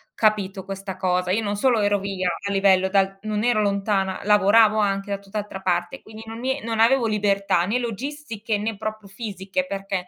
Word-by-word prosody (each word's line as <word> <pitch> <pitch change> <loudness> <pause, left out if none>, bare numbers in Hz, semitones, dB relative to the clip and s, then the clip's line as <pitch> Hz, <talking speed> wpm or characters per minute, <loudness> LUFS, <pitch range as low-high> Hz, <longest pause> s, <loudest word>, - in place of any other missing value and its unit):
capito 200 -3 +1
questa 195 -1 -6
cosa. 180 -1 0
Io 220 +3 +1
non 205 0 -1
solo 235 -1 +2
ero 205 0 +2
via 190 -2 -2 0.2
a 200 - -2
livello 195 -1 +4
dal 195 0 +1
non 215 0 -2
ero 240 -3 +2
lontana, 200 -2 0
lavoravo 210 +2 +5
anche 200 0 0
da 200 - 0
tutt'altra 200 0 -6
parte, 180 +7 -1
quindi 220 0 -11
non 225 +2 -8
e 265 +1 -1
non 225 -1 -2
avevo 235 +1 +4
libertà 200 -4 +1
né 215 +6 0
logistiche 235 -2 -4
né 215 +1 -3
proprio 215 -1 -6
fisiche 200 +4 -4
perché 195 -4 -4
205 Hz, 185 wpm, -23 LUFS, 195-220 Hz, 0.2 s, lavoravo